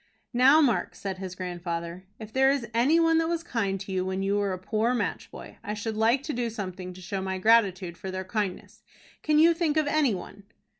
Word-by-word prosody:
"Now, 265 +6 +6
Mark," 255 -7 +1
said 190 -2 -5
his 185 -1 -6
grandfather, 175 -1 -5
"if 220 -1 -10
there 265 0 +4
is 270 -4 0
any 265 +8 +4
one 330 -1 +4
that 325 - +1
was 335 -1 -2
kind 200 - -2
to 200 - -7
you 185 -1 0
when 190 +1 -2
you 200 +1 +1
were 205 -1 0
a 185 - -3
poor 220 +6 0
match - - -3
boy, - - -11
I 210 - -4
should 215 +1 -4
like 230 +5 +2
to 300 - -4
do 240 -1 -1
something 185 -4 -6
to 185 - -12
show 195 +1 -4
my 190 0 -3
gratitude 190 -4 +2
for 190 - -6
their 185 0 -4
kindness. 200 -1 -4 0.4
Can 305 -1 +2
you 330 +2 +6
think 320 -2 0
of 310 - +3
any 290 -6 +2
one?" 195 +2 -10
210 Hz, 230 wpm, -27 LUFS, 185-265 Hz, 0.4 s, Now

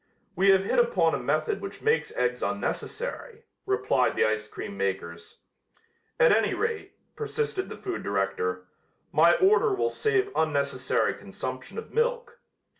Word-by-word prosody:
"We 195 +1 +4
have 190 0 +5
hit 200 - +1
upon 485 0 +3
a - - 0
method 430 -3 -1
which 395 - -8
makes 445 0 +2
eggs - - 0
unnecessary," 475 -2 -4 0.2
replied 395 +3 +1
the 460 - +3
ice - - -1
cream 375 - -7
makers. 85 - -4 0.8
"At - - +6
any - - +1
rate," 455 -1 -3 0.2
persisted 445 -3 -3
the - - -7
food 380 -2 -4
director, 95 -2 -1 0.5
"my 170 +2 +5
order 420 +2 +4
will 465 +4 0
save 405 -2 0
unnecessary 140 -4 +1
consumption - - -7
of 455 - -7
milk." 480 +1 -1
390 Hz, 140 wpm, -27 LUFS, -, 0.8 s, At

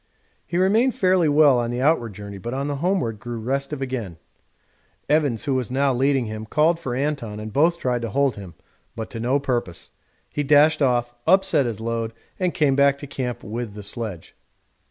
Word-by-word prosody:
He 175 - -2
remained 215 +7 +3
fairly 185 -4 +3
well 145 -3 +5
on 120 -1 -1
the 120 +1 -3
outward 130 -6 +1
journey, 100 -1 -8
but 120 +7 -5
on 140 +1 -2
the 145 -1 -2
homeward 165 - -1
grew 120 0 -6
restive 135 +4 -2
again; 115 -10 -4 0.9
Evans, 145 -6 +1
who 140 - 0
was 130 -3 -1
now 135 +1 +1
leading 135 0 +1
him, 110 0 -6
called 160 +6 +2
for 130 -7 -4
Anton, 130 -6 -2
and 110 0 -7
both 165 +4 +3
tried 125 -6 -1
to 115 - -3
hold 140 +3 +1
him, 95 -5 -10 0.4
but 110 -2 -6
to 115 - -6
no 125 +5 +1
purpose 120 -11 -3 0.4
he 150 - -3
dashed 150 +2 +4
off, 120 -3 +1
upset 190 -8 +4
his 110 -3 -4
load, 115 0 -3 0.3
and 180 -2 0
came 140 -3 +3
back 140 0 +4
to 145 - -8
camp 130 -3 -4
with 110 0 -5
the 105 - -8
sledge. 100 -4 -6
130 Hz, 195 wpm, -23 LUFS, 115-145 Hz, 0.9 s, well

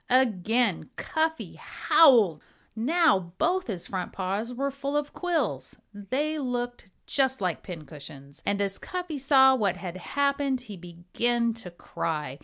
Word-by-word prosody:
Again 240 -1 +2
Cuffy 320 0 -2
howled! 225 - +4 0.3
Now 235 - +2
both 360 +3 +1
his 190 -7 -4
front 185 -2 -4
paws 195 +5 -2
were 275 +3 -2
full 280 +1 -2
of 295 0 -3
quills. 275 - -2 0.2
They 270 +10 -2
looked 245 -5 -4 0.2
just 265 -3 +1
like 180 -4 -1
pincushions. 145 -4 -10
And 200 0 0
as 195 -1 -2
Cuffy 355 -5 -5
saw 265 -1 +6
what 200 -7 +1
had 185 -2 -6
happened 280 +4 0
he 220 -5 -9
began 190 +7 -1
to 220 -5 -10
cry. 150 -5 -4
235 Hz, 135 wpm, -27 LUFS, 185-280 Hz, 0.3 s, saw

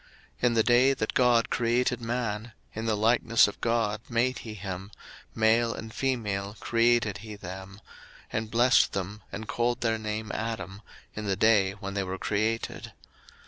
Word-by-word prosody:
In 120 -1 +3
the 110 - +4
day 125 +3 +4
that 110 - -2
God 120 -2 +3
created 125 0 +1
man, 115 -1 -3 0.2
in 110 +1 -4
the 110 -2 +1
likeness 115 +1 +4
of 100 - -8
God 115 -3 0
made 120 +2 +1
he 110 -2 -8
him; 95 -1 -6 0.4
01:005:002 - - -30
Male 115 +1 +3
and 110 0 -8
female 105 -6 -2
created 115 -3 +2
he 110 0 -8
them; 95 +1 -9 0.5
and 110 0 -2
blessed 120 +3 +4
them, 100 +2 -4
and 110 - -6
called 120 0 0
their 115 -1 +1
name 110 0 -4
Adam, 105 -3 -4 0.3
in 105 - -5
the 95 - +1
day 100 -2 +4
when 100 -1 -7
they 100 - -1
were 95 0 -4
created. 110 +3 -2
110 Hz, 165 wpm, -28 LUFS, 105-115 Hz, 0.5 s, the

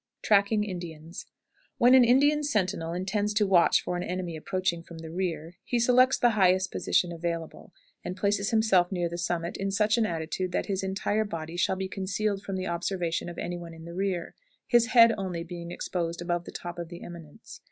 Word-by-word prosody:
TRACKING 210 +1 +3
INDIANS. 170 -4 -7 0.5
When 245 +2 +5
an 260 -1 +8
Indian 285 +5 +4
sentinel 195 - -1
intends 205 +4 -1
to 210 0 +3
watch 185 -3 +4
for 180 - -3
an - - -3
enemy 180 -2 -4
approaching 175 +1 -2
from 170 0 -12
the 160 0 -8
rear, 175 -2 -4
he 240 - -1
selects 255 +2 +4
the 240 - +3
highest 190 -2 +3
position 175 - +1
available, 170 -1 -5 0.3
and 180 - -5
places 200 0 0
himself 210 -5 +3
near 175 -2 0
the 170 +1 -6
summit 170 0 -2
in 195 0 -2
such 210 +3 +2
an 220 - +2
attitude 170 +2 -3
that - - 0
his 195 -2 -2
entire 195 +3 -1
body 165 -5 -6
shall 175 +2 +1
be 190 0 -3
concealed 195 +1 -2
from 195 -1 -5
the 185 0 -3
observation 175 -1 -2
of 170 - -9
any 175 0 -4
one 170 -1 -9
in 160 0 -12
the 170 - -8
rear, 185 -2 -2 0.3
his 240 -2 +4
head 230 -2 +7
only 180 -3 -3
being 170 0 -8
exposed 170 -1 -3
above 175 0 -2
the - - -8
top 175 0 -7
of 170 -1 -5
the 175 -1 -9
eminence. 165 -4 -11
185 Hz, 200 wpm, -27 LUFS, 170-205 Hz, 0.5 s, an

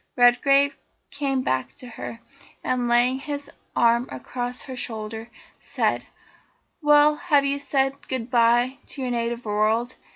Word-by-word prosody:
Redgrave 275 +3 +4 0.4
came 275 -2 -1
back 130 - -1
to - - -9
her, 230 0 -8 0.4
and 250 -1 0
laying 245 +2 +3
his 285 0 -6 0.2
arm 235 +1 +3
across 245 - -5
her 260 - -7
shoulder, 220 -1 -5 0.3
said: - - -1 0.8
"Well, 295 0 +5
have 295 -4 +2
you 280 0 0
said 275 -1 -1
goodbye 240 0 +2
to 270 - -5
your 250 - -2
native 235 0 -2
world? 215 +4 0
250 Hz, 130 wpm, -24 LUFS, 235-275 Hz, 0.8 s, Well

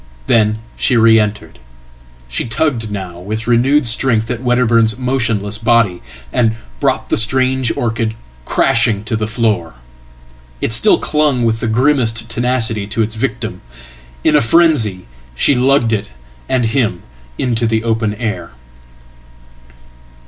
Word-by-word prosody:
Then 110 - +2 0.2
she 125 - +1
re 115 0 +5
entered. 105 0 -3 0.7
She 60 - -3
tugged 115 -1 -1
now 95 -4 -6
with 110 +5 -5
renewed 130 +5 +2
strength 115 -1 +2
atWedderburn's 120 -2 +1
motionless 115 -5 -1
body, 115 -5 +2 0.3
and 115 -2 +1 0.2
brought - - -1
the - - +1
strange 130 +1 +2
orchid 115 -1 -2 0.3
crashing 115 - +1
tothe 110 -1 -2
floor. 110 - -1 0.8
It 115 - 0
still 210 - +5
clung 150 -5 0
with 115 0 0
the 115 - -2
grimmest 115 -2 +1
tenacity 115 -3 0
to 110 +2 -1
its 110 0 -4
victim. 110 -5 -4 0.6
In - - +3
afrenzy, 125 - +2 0.3
she 140 - +3
lugged 125 -2 +2
it 105 -1 -2 0.4
and 125 -2 +1
him 110 -6 -1 0.3
into 120 -2 0
the 110 0 0
open 110 -2 -1
air. 105 - -5
115 Hz, 125 wpm, -15 LUFS, 110-125 Hz, 0.8 s, re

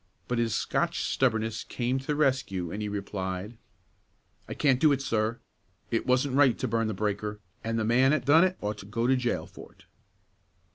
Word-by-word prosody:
But 120 -1 -1
his 115 -1 0
Scotch - - 0
stubbornness 110 -3 0
came 125 +2 -2
to 135 - -12
the 150 - 0
rescue, 130 - 0
and 105 - -4
he 105 - -2
replied, 100 +1 -4 0.9
"I - - -5
can't 135 -4 +3
do 155 0 +5
it, 140 - +2
sir; 115 -3 -1 0.5
it 115 - -1
wasn't 130 +1 +2
right 135 -4 +5
to - - -2
burn 115 0 0
the 110 - -3
breaker, 105 +1 -2 0.2
an' 115 0 -2
the 110 -1 0
man 130 +4 +4
'at 145 -5 0
done 155 +5 +6
it 185 0 +1
ought 105 0 -3
to 100 - -10
go 115 +3 -1
to 130 +2 +4
jail 125 -2 -1
for - - -13
it." - - -23
115 Hz, 200 wpm, -28 LUFS, 105-130 Hz, 0.9 s, done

